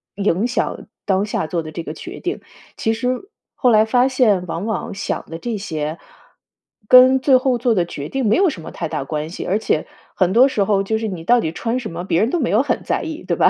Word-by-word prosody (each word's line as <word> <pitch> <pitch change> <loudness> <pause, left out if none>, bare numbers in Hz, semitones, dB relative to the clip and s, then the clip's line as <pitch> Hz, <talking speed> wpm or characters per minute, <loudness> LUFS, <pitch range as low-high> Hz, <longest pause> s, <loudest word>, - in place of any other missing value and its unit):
影 200 +2 +1
响 250 - -2 0.2
当 195 0 +2
下 210 - -2
做 170 +2 -2
的 155 -1 -8
这 165 +2 -6
个 155 - -6
决 355 - -9
定。 360 +3 -4 0.4
其 220 - 0
实 250 - -3 0.3
后 250 - +5
来 215 -1 +6
发 245 +3 +3
现 225 -9 +2
往 170 +3 -4
往 220 -3 -3
想 195 0 -4
的 165 - -6
这 225 +5 -4
些 155 -5 -4 0.9
跟 255 +2 +7
最 260 0 +4
后 255 -1 +2
做 240 -1 +1
的 180 - +2
决 145 -4 -6
定 270 +5 -2
没 210 - +3
有 380 0 +4
什 195 - -7
么 160 - -9
太 165 - -4
大 145 - -3
关 150 +2 -4
系， 175 - -6
而 195 +4 +1
且 155 - 0 0.3
很 185 -1 +2
多 245 +6 +6
时 215 -7 0
候 195 0 +2
就 220 +3 -1
是 220 0 -3
你 180 -4 -6
到 245 +3 +4
底 160 - -2
穿 230 +8 -2
什 230 -6 -5
么， 170 +2 -5
别 170 -2 +1
人 225 - +2
都 345 - 0
没 255 - 0
有 215 +4 +4
很 - - -1
在 - - 0
意， 320 0 -6
对 - - -1
吧？ - - +5
215 Hz, 270 characters per minute, -20 LUFS, 175-250 Hz, 0.9 s, 跟